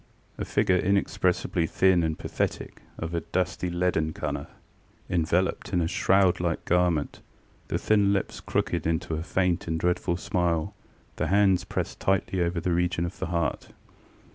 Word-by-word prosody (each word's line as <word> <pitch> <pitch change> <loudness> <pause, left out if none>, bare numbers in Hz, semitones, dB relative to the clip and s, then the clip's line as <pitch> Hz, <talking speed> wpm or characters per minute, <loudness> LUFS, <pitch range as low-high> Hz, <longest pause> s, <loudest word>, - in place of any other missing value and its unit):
A - - -2
figure 90 - +2
inexpressibly 95 -3 +1
thin 95 0 +3
and 80 -1 -1
pathetic, - - -3 0.2
of 80 +1 -5
a 85 - 0
dusty 90 0 -2
leaden 85 -3 0
colour, 70 -2 -4 0.6
enveloped 90 +3 0
in 90 - +3
a 85 - +1
shroud 95 +1 +3
like 85 -2 -2
garment, 90 -4 +1 0.5
the - - -1
thin 105 -2 +3
lips 100 -1 -1
crooked - - -1
into 80 0 -1
a 80 - -2
faint 90 0 0
and 80 0 -1
dreadful 90 0 0
smile, 85 -2 -1 0.4
the - - 0
hands 95 -2 +3
pressed - - -4
tightly 95 -1 0
over 85 0 0
the 85 +1 0
region 85 0 +1
of 85 - -7
the - - -2
heart. 85 -1 -2
90 Hz, 155 wpm, -27 LUFS, 85-95 Hz, 0.6 s, thin